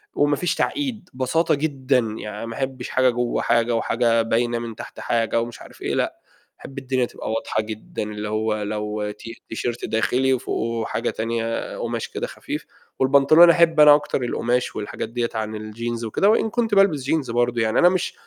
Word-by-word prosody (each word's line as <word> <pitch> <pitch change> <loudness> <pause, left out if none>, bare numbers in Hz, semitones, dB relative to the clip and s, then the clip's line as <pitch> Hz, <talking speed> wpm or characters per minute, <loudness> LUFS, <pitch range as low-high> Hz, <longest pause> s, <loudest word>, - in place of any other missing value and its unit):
وما 145 0 +3
فيش 175 +3 -1
تعقيد 245 -10 -2
بساطة 130 +6 +1
جدًا، 140 -3 +1 0.2
يعني 105 +1 -6
ما 115 - -6
أحبش 130 -1 -4
حاجة 130 0 +3
جوّه 120 0 -1
حاجة، 115 0 +2
وحاجة 115 0 +2
باينة 120 +1 0
من 115 -1 -6
تحت - - -10
حاجة، 115 0 0
ومش 120 0 -7
عارف - - -14
إيه، - - -2
لأ، - - -1 0.4
أحب 135 - -11
الدنيا 130 -2 0
تبقى 115 - -6
واضحة 110 -1 -1
جدًا، 110 0 -6
اللي 105 0 -5
هو 110 0 -1
لو 105 0 -3
تي 115 +3 -11
تيشيرت 120 +1 -3
داخلي 130 +4 +1
وفوقُه 115 -2 -2
حاجة 115 - -1
تانية 115 0 -3
قُماش - - -3
كده - - -4
خفيف، - - -6 0.3
والبنطلون، 140 +5 +6
أحب 170 -2 +4
أنا 150 -1 +9
أكتر 145 -2 -2
القُماش 120 +1 -1
والحاجات 105 +1 -5
دِيَّة 120 0 -2
عن 110 0 -3
الجينز 115 +2 -4
وكده، 155 - +2
وإن 225 0 +3
كنت 225 -2 0
بالبس 195 -9 +4
جينز 145 -2 -1
برضه 120 0 +1
يعني 110 -1 +1
أنا 175 - +7
مش 185 -1 -1
120 Hz, 180 wpm, -22 LUFS, 115-140 Hz, 0.4 s, أنا